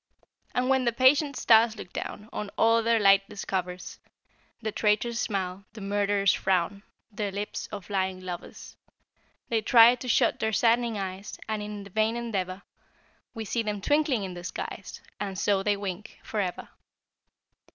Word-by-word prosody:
And 250 Hz, 0 st, +1 dB
when 265 Hz, -1 st, +2 dB
the 235 Hz, -, +3 dB
patient 275 Hz, +4 st, +4 dB
stars 225 Hz, 0 st, +5 dB
look 180 Hz, -, -10 dB
down, 210 Hz, +1 st, -6 dB
On 210 Hz, -, -4 dB
all 230 Hz, +1 st, +4 dB
their 230 Hz, 0 st, +2 dB
light 195 Hz, -1 st, +5 dB
discovers, 185 Hz, -2 st, -4 dB, 0.6 s
The 220 Hz, -2 st, -3 dB
traitor's 225 Hz, +3 st, +1 dB
smile, 195 Hz, -4 st, -2 dB
the 220 Hz, -, -10 dB
murderer's 200 Hz, 0 st, +2 dB
frown, 190 Hz, +1 st, 0 dB, 0.3 s
The 205 Hz, -1 st, -3 dB
lips 205 Hz, +2 st, -4 dB
of 200 Hz, -4 st, -7 dB
lying 190 Hz, -2 st, -1 dB
lovers, 180 Hz, -2 st, -8 dB, 0.7 s
They 225 Hz, -1 st, +1 dB
try 230 Hz, +2 st, +7 dB
to 250 Hz, +1 st, -7 dB
shut 240 Hz, -, +2 dB
their 220 Hz, 0 st, 0 dB
saddening 235 Hz, 0 st, +2 dB
eyes 190 Hz, +1 st, -5 dB
And 215 Hz, -1 st, -2 dB
in 210 Hz, -1 st, -6 dB
the 200 Hz, -, -13 dB
vain 220 Hz, +3 st, +1 dB
endeavor 195 Hz, -5 st, -3 dB, 0.7 s
We 225 Hz, -1 st, -4 dB
see 230 Hz, +3 st, -1 dB
them 210 Hz, -2 st, -3 dB
twinkling 290 Hz, -1 st, +1 dB
in 185 Hz, -1 st, -5 dB
the 175 Hz, 0 st, -8 dB
skies, 180 Hz, -, -6 dB, 0.2 s
And 195 Hz, -2 st, -4 dB
so 195 Hz, +1 st, +2 dB
they 205 Hz, 0 st, +1 dB
wink, 200 Hz, 0 st, -6 dB
forever. 200 Hz, -5 st, -3 dB
210 Hz, 160 wpm, -27 LUFS, 195-230 Hz, 0.7 s, try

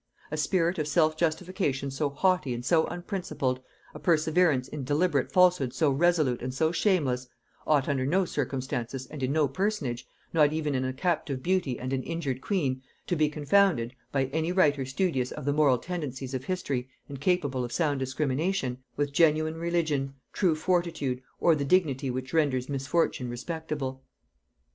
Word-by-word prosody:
A 155 Hz, -, -2 dB
spirit 170 Hz, +3 st, +1 dB
of 150 Hz, -, -1 dB
self 155 Hz, +1 st, +3 dB
justification 155 Hz, -4 st, -1 dB
so 145 Hz, +2 st, -1 dB
haughty 150 Hz, -3 st, +1 dB
and 120 Hz, +1 st, -6 dB
so 160 Hz, +3 st, +3 dB
unprincipled, 175 Hz, -8 st, -3 dB, 0.3 s
a -, -, -8 dB
perseverance 160 Hz, -4 st, +2 dB
in 145 Hz, -1 st, -6 dB
deliberate 145 Hz, +1 st, +1 dB
falsehood 180 Hz, -9 st, +4 dB
so 150 Hz, -1 st, +3 dB
resolute 155 Hz, -3 st, +2 dB
and 125 Hz, +1 st, -3 dB
so 160 Hz, +5 st, +1 dB
shameless, 145 Hz, -10 st, +1 dB, 0.4 s
ought 145 Hz, -3 st, +3 dB
under 140 Hz, -2 st, 0 dB
no 180 Hz, +8 st, +2 dB
circumstances 130 Hz, -3 st, -3 dB
and 150 Hz, 0 st, -9 dB
in 130 Hz, +1 st, 0 dB
no 150 Hz, -1 st, +3 dB
personage, 140 Hz, -, -2 dB, 0.3 s
not 150 Hz, -3 st, +5 dB
even 155 Hz, -2 st, -1 dB
in 130 Hz, -1 st, 0 dB
a 130 Hz, -, -1 dB
captive 140 Hz, -3 st, -1 dB
beauty 175 Hz, -9 st, 0 dB
and 130 Hz, +1 st, -4 dB
an 130 Hz, -, 0 dB
injured 140 Hz, -5 st, -3 dB
queen, 135 Hz, -10 st, -1 dB, 0.2 s
to 175 Hz, -, 0 dB
be 155 Hz, -2 st, +2 dB
confounded, 150 Hz, -4 st, +2 dB, 0.2 s
by 135 Hz, -1 st, +1 dB
any 160 Hz, +2 st, 0 dB
writer 145 Hz, -8 st, +2 dB
studious 135 Hz, -3 st, 0 dB
of 150 Hz, -, -7 dB
the 145 Hz, -, +2 dB
moral 145 Hz, -4 st, +4 dB
tendencies 135 Hz, -4 st, -5 dB
of 130 Hz, 0 st, -3 dB
history 135 Hz, -9 st, -2 dB, 0.2 s
and 140 Hz, -2 st, -8 dB
capable 145 Hz, -7 st, +1 dB
of 120 Hz, -, -5 dB
sound 145 Hz, -3 st, 0 dB
discrimination, 135 Hz, +1 st, -1 dB, 0.2 s
with 145 Hz, -1 st, -1 dB
genuine 155 Hz, +1 st, +3 dB
religion, 160 Hz, -5 st, -1 dB, 0.2 s
true 175 Hz, -5 st, +2 dB
fortitude, 160 Hz, -6 st, 0 dB, 0.2 s
or 170 Hz, -, +5 dB
the 145 Hz, -2 st, 0 dB
dignity 140 Hz, -4 st, +2 dB
which 130 Hz, +2 st, -4 dB
renders 140 Hz, -6 st, +1 dB
misfortune 135 Hz, -1 st, 0 dB
respectable. 135 Hz, 0 st, -4 dB
145 Hz, 165 wpm, -28 LUFS, 130-170 Hz, 0.4 s, not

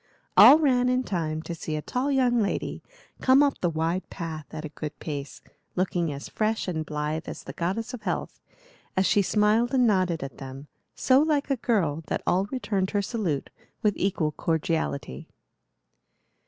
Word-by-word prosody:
All 295 Hz, -, +10 dB
ran 250 Hz, -5 st, +3 dB
in 255 Hz, +1 st, +1 dB
time 160 Hz, -7 st, -2 dB
to 170 Hz, -, -5 dB
see 160 Hz, -1 st, -4 dB
a 150 Hz, -, -2 dB
tall 255 Hz, +3 st, -1 dB
young 250 Hz, -3 st, +3 dB
lady 200 Hz, -, -2 dB, 0.4 s
come 265 Hz, +2 st, +6 dB
up 285 Hz, -1 st, +1 dB
the 175 Hz, -, +2 dB
wide 165 Hz, +3 st, -2 dB
path 160 Hz, -4 st, -6 dB
at 155 Hz, -, -6 dB
a -, -, -5 dB
good 150 Hz, 0 st, -7 dB
pace, 145 Hz, -3 st, -6 dB, 0.3 s
looking 175 Hz, -3 st, 0 dB
as 140 Hz, 0 st, -6 dB
fresh 215 Hz, -1 st, -1 dB
and 160 Hz, -3 st, -2 dB
blithe 150 Hz, +1 st, -3 dB
as -, -, -7 dB
the -, -, -8 dB
goddess 220 Hz, +8 st, -2 dB
of 245 Hz, -, -6 dB
health, -, -, -3 dB, 0.6 s
as 190 Hz, -, +3 dB
she 205 Hz, -, +4 dB
smiled 215 Hz, +6 st, +2 dB
and 250 Hz, -1 st, +4 dB
nodded 185 Hz, -7 st, +1 dB
at 135 Hz, -3 st, -8 dB
them, 135 Hz, +1 st, -8 dB, 0.3 s
so 260 Hz, 0 st, +4 dB
like 295 Hz, -2 st, +1 dB
a -, -, +3 dB
girl 185 Hz, -, 0 dB
that -, -, -2 dB
all 185 Hz, +2 st, +2 dB
returned 200 Hz, -5 st, -2 dB
her 205 Hz, -, 0 dB
salute 190 Hz, -, -2 dB, 0.3 s
with 210 Hz, -1 st, +3 dB
equal 180 Hz, -5 st, 0 dB
cordiality. 160 Hz, -, -2 dB
185 Hz, 175 wpm, -26 LUFS, 155-240 Hz, 0.6 s, All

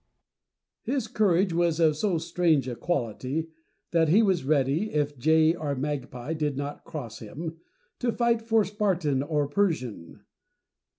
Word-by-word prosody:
His 260 Hz, -2 st, -2 dB
courage 195 Hz, -5 st, +2 dB
was 170 Hz, -1 st, +1 dB
of 160 Hz, -2 st, +4 dB
so 180 Hz, +3 st, 0 dB
strange 160 Hz, -4 st, +1 dB
a 125 Hz, -, -3 dB
quality, 140 Hz, +2 st, -2 dB, 0.4 s
that 165 Hz, -2 st, +3 dB
he 205 Hz, +8 st, +5 dB
was 190 Hz, -7 st, +2 dB
ready, 145 Hz, +7 st, +1 dB
if 145 Hz, -1 st, 0 dB
jay 160 Hz, +4 st, +4 dB
or 150 Hz, -4 st, -3 dB
magpie 135 Hz, 0 st, -4 dB
did 150 Hz, -3 st, -2 dB
not 145 Hz, +1 st, -5 dB
cross 125 Hz, -8 st, -7 dB
him, 160 Hz, +9 st, -7 dB, 0.4 s
to 245 Hz, -1 st, +1 dB
fight 235 Hz, -1 st, +1 dB
for 225 Hz, -2 st, +2 dB
Spartan 180 Hz, -9 st, 0 dB
or 145 Hz, 0 st, 0 dB
Persian. 140 Hz, -, -2 dB
160 Hz, 140 wpm, -27 LUFS, 140-185 Hz, 0.4 s, he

